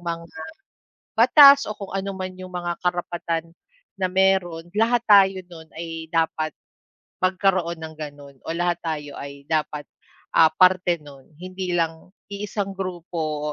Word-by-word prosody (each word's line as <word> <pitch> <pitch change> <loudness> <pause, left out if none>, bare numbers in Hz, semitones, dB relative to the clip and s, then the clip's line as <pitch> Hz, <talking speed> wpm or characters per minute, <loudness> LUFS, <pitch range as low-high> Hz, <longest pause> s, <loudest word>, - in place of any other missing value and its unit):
mga, 170 -1 -4 0.9
batas 280 +3 +8
o 215 - -4
kung 200 -2 -8
ano 195 0 -3
man 185 0 -5
yung 185 0 -9
mga 175 -1 -3
karapatan 170 -2 -2 0.5
na 185 - +1
meron. 185 -3 +2
Lahat 235 +2 +3
tayo 195 -2 +6
nun 160 -2 -12
ay 165 -1 -6
dapat 160 -2 0 0.7
magkaroon 185 -2 +1
ng 160 0 -8
ganon, 145 -2 -9
o - - -5
lahat 175 -1 0
tayo 150 -3 -4
ay 140 0 -9
dapat, 150 -2 -1 0.5
ah, 160 - +7
parte 180 0 +4
nun, 140 -2 -14
hindi 185 0 -5
lang 165 0 -2 0.2
iisang 200 0 -4
grupo 165 -5 -4
175 Hz, 140 wpm, -23 LUFS, 160-190 Hz, 0.9 s, batas